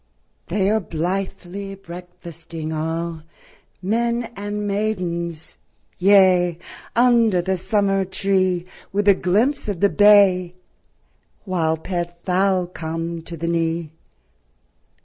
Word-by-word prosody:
They 190 Hz, +1 st, 0 dB
are 220 Hz, -, +3 dB
blithely 195 Hz, +2 st, -4 dB
breakfasting 170 Hz, -3 st, -9 dB
allŌĆö 160 Hz, +1 st, -3 dB, 0.6 s
Men 235 Hz, +4 st, 0 dB
and 205 Hz, +1 st, -4 dB
maidensŌĆöyea, 180 Hz, -1 st, +1 dB, 0.4 s
Under 235 Hz, -5 st, +4 dB
the 190 Hz, +2 st, 0 dB
summer 195 Hz, +1 st, +1 dB
tree, 185 Hz, -2 st, 0 dB, 0.3 s
With 205 Hz, +1 st, -1 dB
a 200 Hz, -, +8 dB
glimpse 215 Hz, +11 st, +1 dB
of 200 Hz, -5 st, -3 dB
the 200 Hz, -, +4 dB
bay, 195 Hz, -4 st, +5 dB, 0.9 s
While 165 Hz, -4 st, 0 dB
pet 175 Hz, 0 st, -4 dB
fowl 185 Hz, 0 st, +2 dB
come 165 Hz, -1 st, -5 dB
to 170 Hz, +1 st, -9 dB
the 165 Hz, +2 st, -3 dB
knee 165 Hz, -1 st, -1 dB
185 Hz, 100 wpm, -21 LUFS, 170-200 Hz, 0.9 s, a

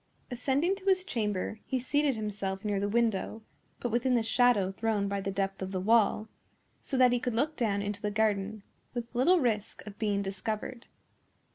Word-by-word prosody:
Ascending 275 Hz, +9 st, +1 dB
to 390 Hz, -, -13 dB
his 380 Hz, -1 st, +3 dB
chamber, 210 Hz, -, -2 dB
he 265 Hz, -, 0 dB
seated 280 Hz, +2 st, +1 dB
himself 200 Hz, -2 st, -4 dB
near 205 Hz, -2 st, 0 dB
the 200 Hz, +1 st, -1 dB
window, 225 Hz, -1 st, 0 dB, 0.4 s
but 240 Hz, -, -2 dB
within 245 Hz, +2 st, +2 dB
the 235 Hz, -, +2 dB
shadow 235 Hz, -5 st, +3 dB
thrown 210 Hz, 0 st, 0 dB
by 200 Hz, 0 st, -2 dB
the 195 Hz, -, -3 dB
depth 195 Hz, 0 st, -2 dB
of 190 Hz, 0 st, -3 dB
the 185 Hz, -, -1 dB
wall, 215 Hz, +1 st, +3 dB, 0.5 s
so 270 Hz, -, -2 dB
that 250 Hz, -1 st, +6 dB
he 245 Hz, -, +2 dB
could 245 Hz, -2 st, -2 dB
look 295 Hz, +6 st, +1 dB
down 205 Hz, -6 st, 0 dB
into 205 Hz, 0 st, -4 dB
the 210 Hz, -, 0 dB
garden 210 Hz, -1 st, 0 dB, 0.3 s
with 240 Hz, 0 st, -4 dB
little 290 Hz, +9 st, +4 dB
risk 225 Hz, -7 st, -1 dB
of 210 Hz, -1 st, -10 dB
being 205 Hz, -2 st, 0 dB
discovered. 215 Hz, +5 st, -4 dB
220 Hz, 185 wpm, -30 LUFS, 200-245 Hz, 0.5 s, that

